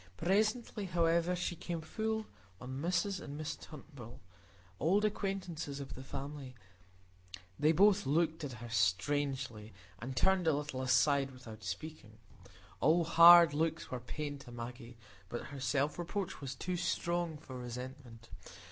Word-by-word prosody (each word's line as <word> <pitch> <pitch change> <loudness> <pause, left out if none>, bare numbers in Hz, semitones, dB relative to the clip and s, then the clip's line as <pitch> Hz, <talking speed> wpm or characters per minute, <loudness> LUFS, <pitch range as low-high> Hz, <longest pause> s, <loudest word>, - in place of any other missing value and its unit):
Presently, 210 +3 +1
however, 170 0 +2
she 175 0 -2
came 170 0 -4
full 220 +6 -2 0.3
on 130 +2 -6
Mrs 180 +3 0
and 145 0 -7
Miss 155 0 -3
Turnbull, 140 -6 -11 0.6
old 195 +7 +3
acquaintances 185 -8 -3
of 140 - -7
her 130 - -8
family; 135 -1 -7 1.0
they 155 +1 +5
both 200 +2 +4
looked 160 +2 +1
at 140 -3 -4
her 120 0 -8
strangely, 115 +3 0 0.3
and 130 +4 -6
turned 190 -3 +3
a 160 - +5
little 145 -3 -3
aside 135 +2 +3
without 115 -4 -11
speaking. 155 -9 -7 0.6
All 165 +3 +4
hard 170 -1 +9
looks 160 +1 -1
were 125 - -3
pain 145 +4 -5
to 120 - -12
Maggie, 120 0 -8 0.3
but 120 - -5
her 140 - -6
self 140 +4 0
reproach 175 +1 -3
was 135 -1 -5
too 180 +7 -3
strong 170 -1 -1
for 140 -3 -10
resentment. 125 -1 -8
150 Hz, 140 wpm, -34 LUFS, 130-175 Hz, 1.0 s, hard